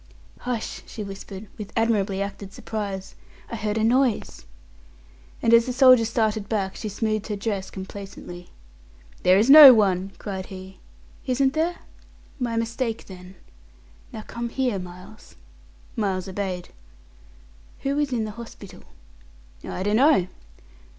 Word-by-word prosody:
"Hush!" 245 -3 -4
she 215 - -6
whispered, 195 +1 -9
with 205 -2 -7
admirably 205 -4 +1
acted 200 -1 -8
surprise 200 -3 -5 0.4
"I - - -3
heard 215 -1 -2
a 220 - +1
noise!" 245 - +1 1.0
and 230 - +4
as 230 +1 +6
the 250 - -2
soldier 255 -3 +6
started 220 -2 -1
back, 195 -4 -1
she 215 - -5
smoothed 215 0 -2
her 210 - -2
dress 200 -2 -3
complacently. 190 -2 -9 0.7
"There 185 +1 +5
is 215 +4 +3
no 280 -2 +11
one!" 195 -2 +1
cried 190 -2 -6
he. 190 0 -10 0.5
"Isn't 265 +1 +2
there? 330 +3 0 0.6
My 240 -2 -2
mistake, 230 0 -2
then. 185 0 -12 0.8
Now 215 - -7
come 235 +1 -5
here, 245 -5 -1
Miles." 180 0 -12 0.6
Miles 195 -3 -1
obeyed. 185 -2 -4 1.1
"Who 280 +1 -1
is 290 -2 0
in 230 -3 -1
the 215 - -5
hospital?" 205 -5 -11 0.8
"I 185 - -4
dunno." 215 - +3
215 Hz, 130 wpm, -24 LUFS, 195-235 Hz, 1.1 s, no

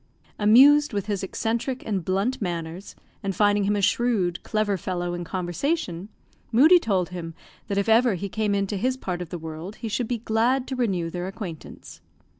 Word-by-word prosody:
Amused 275 +7 +6
with 200 -1 -2
his 205 -2 -2
eccentric 230 +6 -2
and 200 -5 -2
blunt 195 +9 -1
manners, 170 0 -5 0.3
and 195 -3 -3
finding 205 0 +3
him 205 +1 +1
a 200 - -1
shrewd, 195 -7 +1
clever 215 -2 0
fellow 175 -1 -3
in 175 0 -4
conversation, 180 - -3 0.4
Moodie 310 +10 +7
told 190 - 0
him 165 -2 -7 0.3
that 200 -1 -2
if 200 - +1
ever 225 -1 +4
he 200 +3 -4
came 210 0 -1
into 200 0 -1
his 255 +6 0
part 180 -7 -4
of 175 - -6
the 175 - -5
world 160 +5 -7
he 230 - -6
should 230 +2 -2
be 245 - -1
glad 235 +4 +1
to 265 - -2
renew 190 -9 -1
their 180 +1 -4
acquaintance. 190 -5 -9
200 Hz, 185 wpm, -25 LUFS, 180-230 Hz, 0.4 s, Moodie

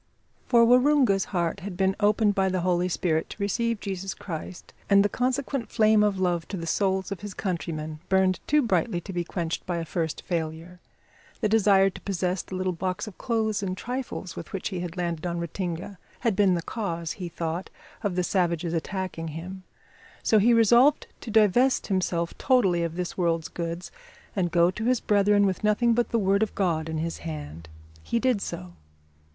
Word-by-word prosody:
For 235 -2 +6
Waroonga's 250 -5 +4
heart 175 -1 -1
had 190 -1 -7
been 190 0 +2
opened 210 0 +3
by 195 -1 +1
the 185 -1 -1
Holy 180 0 +1
Spirit 160 -2 0
to - - -9
receive 230 +2 0
Jesus 195 -1 -4
Christ, 175 0 -7 0.2
and 200 0 +6
the - - +5
consequent 255 +2 -1
flame 215 -2 +4
of 205 -2 +2
love 175 -3 0
to 195 - -5
the 165 - -5
souls 190 +2 0
of 200 - -4
his 205 0 -7
countrymen 160 -5 -4
burned 190 -1 +3
too 300 0 +4
brightly 225 -5 +1
to 190 +3 -8
be 175 -1 -1
quenched 170 -1 -3
by 175 -2 -1
a 165 - -3
first 160 -1 -3
failure. 165 +1 -4 0.6
The 215 - +2
desire 195 -3 +4
to - - -11
possess 185 -1 -1
the 185 - -8
little 185 0 -1
box 185 +2 -3
of 215 -4 -11
clothes 220 -3 0
and 185 -2 -3
trifles 245 -7 -5
with - - -8
which 195 - -2
he 185 -3 -4
had 175 0 -5
landed 170 -1 -2
on 170 0 -2
Ratinga 175 +2 -4 0.2
had 230 -5 +1
been 190 -2 +4
the 170 - -3
cause, 170 -7 -3
he 180 -3 -5
thought, 165 +2 -4 0.3
of 205 -5 -1
the 180 - +1
savages 170 -2 0
attacking 170 0 -3
him; 175 +5 -7 0.6
so 220 - +4
he 230 +4 +4
resolved 235 +5 +5 0.2
to - - -7
divest 220 +4 +4
himself 180 -3 -1
totally 195 -10 +3
of 170 -1 -2
this 180 +1 -4
world's 165 -2 0
goods 170 +1 -5 0.4
and 180 -3 +1
go 170 +1 +4
to 215 +4 -5
his 250 0 +3
brethren 205 0 +3
with 190 +1 -1
nothing 220 +3 +3
but 240 +1 +1
the 230 - +1
Word 200 -1 +2
of 220 - -1
God 165 -5 0
in 160 - -2
his 165 +1 -3
hand. 80 +1 -7 0.3
He 235 - -1
did 245 -3 +1
so. 90 - -6
190 Hz, 190 wpm, -26 LUFS, 170-210 Hz, 0.6 s, For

